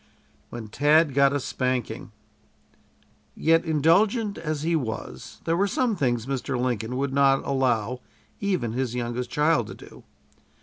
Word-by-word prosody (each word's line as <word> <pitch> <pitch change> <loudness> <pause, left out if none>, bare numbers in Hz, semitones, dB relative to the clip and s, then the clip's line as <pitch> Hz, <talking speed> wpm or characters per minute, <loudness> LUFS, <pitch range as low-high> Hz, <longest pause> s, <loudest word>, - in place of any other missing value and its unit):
WHEN 120 -2 -7
TAD 145 +6 +3
GOT 140 0 +4
A 145 - 0
SPANKING 125 -4 -3 1.2
Yet, 165 +1 +3
indulgent 195 - +2
as 155 -2 -3
he 165 +1 +1
was, 110 - -5
there 165 - +1
were 200 +3 +2
some 235 +2 0
things 120 - 0
Mr. 135 -1 -2
Lincoln 125 -1 -2
would 140 0 -1
not 135 -1 +3
allow 125 -3 0 0.4
even 185 - -1
his 125 -1 -2
youngest 120 0 -3
child 150 +2 +2
to - - -8
do. - - -14
135 Hz, 140 wpm, -25 LUFS, 125-160 Hz, 1.2 s, GOT